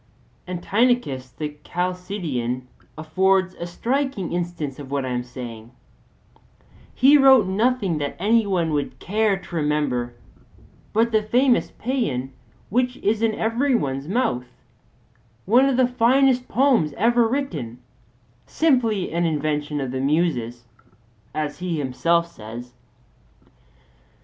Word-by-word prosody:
And 180 -1 -5
Tynnichus 205 - +1
the 150 -1 -5
Chalcidian 175 - -3 0.3
affords 185 +4 +1
a 170 - -6
striking 245 - -2
instance 170 -6 -3
of 140 -2 -8
what 140 -1 -1
I - - -3
am 125 -1 -1
saying: 120 -2 -9 1.3
he 280 +3 +6
wrote 265 -5 +7
nothing 200 -3 0
that 145 -1 -3
any 215 +3 +2
one 175 -5 0
would 145 -1 -2
care 210 0 +1
to 185 -2 -10
remember 150 -6 -1 0.8
but 230 +2 +2
the 215 -1 +3
famous 245 +4 +2
paean 150 - -2 0.4
which 250 +3 +1
is 215 +2 0
in 225 -2 +1
every 245 +5 +1
one's 135 - -2
mouth, 195 - 0 1.0
one 245 +6 +5
of 260 - 0
the 260 - +5
finest 250 +1 +3
poems 250 - +2
ever 235 +3 +3
written, 225 - -3 0.7
simply 235 - +1
an 170 +1 +1
invention 150 -1 -1
of 135 -3 -3
the 130 0 -3
Muses, 135 -6 0 0.7
as 150 0 -3
he 180 -2 -2
himself 165 +5 +1
says. 120 -5 -10
180 Hz, 125 wpm, -23 LUFS, 145-235 Hz, 1.3 s, wrote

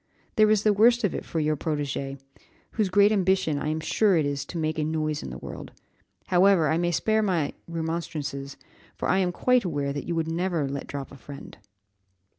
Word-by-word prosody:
There 215 -1 +5
is 215 -1 +3
the 215 - +4
worst 235 +3 +4
of 205 - +1
it - - -4
for 165 - -3
your 155 0 +1
protégé, 140 -2 -3 0.5
whose 215 -4 0
great 200 +2 +5
ambition 190 -6 +1
I - - -3
am 155 +1 -1
sure 190 +4 +2
it 155 - +2
is 140 -1 -2
to 175 - -7
make 155 -1 -1
a - - +1
noise 155 -1 -1
in - - -6
the 65 - -7
world. - - -9 0.6
However, 180 -3 +4
I 160 - +1
may 175 0 +1
spare 220 +5 +1
my 175 -8 0
remonstrances, 160 -4 -4 0.4
for - - -3
I 190 - +3
am 180 -2 +1
quite 250 +6 +2
aware 145 -6 -2
that 145 - -5
you 170 - -1
would 165 -1 -1
never 165 -2 -1
let 140 0 -5
drop 140 -1 -6
a 140 - -11
friend." 140 +1 -11
160 Hz, 210 wpm, -26 LUFS, 145-190 Hz, 0.6 s, There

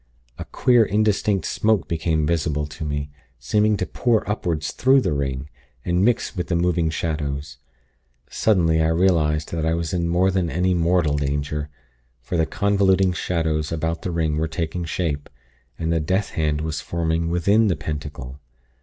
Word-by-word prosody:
A - - -5
queer 120 -2 +3
indistinct 105 -1 +1
smoke 105 -5 +1
became 80 -1 0
visible 75 -2 0
to 75 +3 -8
me, 75 -1 -3 0.3
seeming 105 - +1
to - - -1
pour 115 -3 0
upward 85 -7 -2
through 130 - +3
the 125 - 0
ring, 70 -1 -2 0.4
and 90 +1 +1
mix 120 0 +1
with 90 - -3
the 85 - 0
moving 85 -1 +1
shadows. 75 -3 -3 0.7
Suddenly, 85 -7 +2
I 80 - +3
realized 80 -3 +2
that 80 -2 -2
I 80 +1 +1
was 85 0 -3
in 85 -2 0
more 90 +3 +3
than 90 -3 0
any 90 +2 +1
mortal 85 -3 +2
danger; 70 +1 -2 0.5
for - - -5
the 80 -2 +2
convoluting 95 0 +2
shadows 80 -4 -1
about 80 +1 -2
the 95 - -3
ring 80 -3 0
were 80 +1 0
taking 80 +1 -3
shape, 80 -3 -3 0.5
and 80 0 -1
the 80 - +2
death 95 +6 -1
hand 75 -2 0
was 80 -2 -3
forming 85 -1 -1
within 100 +6 +3
the 90 - +2
Pentacle. 75 -3 -6
80 Hz, 165 wpm, -22 LUFS, 75-90 Hz, 0.7 s, queer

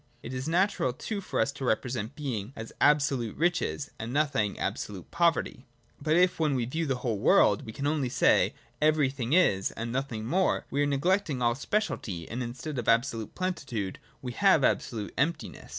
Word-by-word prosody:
— 120 - -36
It 125 - -6
is 130 +2 -4
natural 170 -6 +1
too 200 - -4
for - - -3
us 140 - +2
to 140 -1 -8
represent 120 0 -1
Being 125 -6 -4
as 110 0 -8
absolute 140 -6 +2
riches, 165 -3 0
and 115 +2 -5
No 150 +3 +3
thing 110 -8 -1
as - - -2
absolute 95 -4 -5
poverty. 170 -6 +1 0.3
But 155 +2 +2
if 180 0 +3
when 150 -3 +2
we 125 -2 0
view 160 +6 -2
the 135 - +1
whole 110 -4 0
world - - +4
we - - -5
can 140 +5 -5
only 145 -3 0
say - - +3 0.2
that 150 - +4
everything 140 -4 +1
is, 100 - +4
and 115 +1 -5
nothing 125 -4 -3
more, 185 +10 +1
we 140 - +1
are 145 - +2
neglecting 150 +1 +1
all 120 0 +3
speciality 120 - -2
and, 120 +3 -4
instead 125 +4 -5
of 120 - -4
abso 115 +3 +3
lute 110 -2 -7
plenitude, 140 - -3 0.2
we 125 - -3
have 190 0 +4
absolute 115 -5 0
emptiness. 165 +5 -2
135 Hz, 200 wpm, -28 LUFS, 115-155 Hz, 0.3 s, world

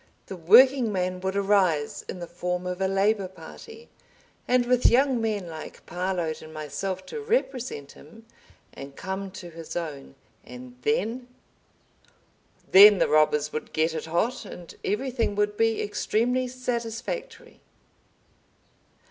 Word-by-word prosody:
The 190 - -7
Working 235 +7 +6
Man 185 -1 -2
would 190 +1 -3
arise—in 190 -6 +1
the 175 - -6
form 180 +1 -4
of 180 +1 -4
a 190 - +2
Labor 195 +1 +1
Party, 315 - -13 0.6
and 250 0 +3
with 250 0 +3
young 260 0 +3
men 215 -4 -1
like 160 -2 -9
Parload 175 -3 -3
and 155 - -11
myself 180 +5 -5
to 455 - -6
represent 265 - -2
him—and 160 -7 -15
come 190 +1 -5
to 180 -2 -10
his 165 -1 -9
own, 150 -5 -6 0.3
and 250 0 -11
then———? 255 - -1 1.4
Then 205 +1 +9
the - - +2
robbers 150 -1 +2
would 155 - -5
get 160 +1 +1
it 160 - -4
hot, 215 +10 -1
and 175 -2 -10
everything 235 0 -1
would 210 0 0
be 225 +1 +1
extremely 240 +5 0
satisfactory. 250 - -5
195 Hz, 130 wpm, -26 LUFS, 175-245 Hz, 1.4 s, Then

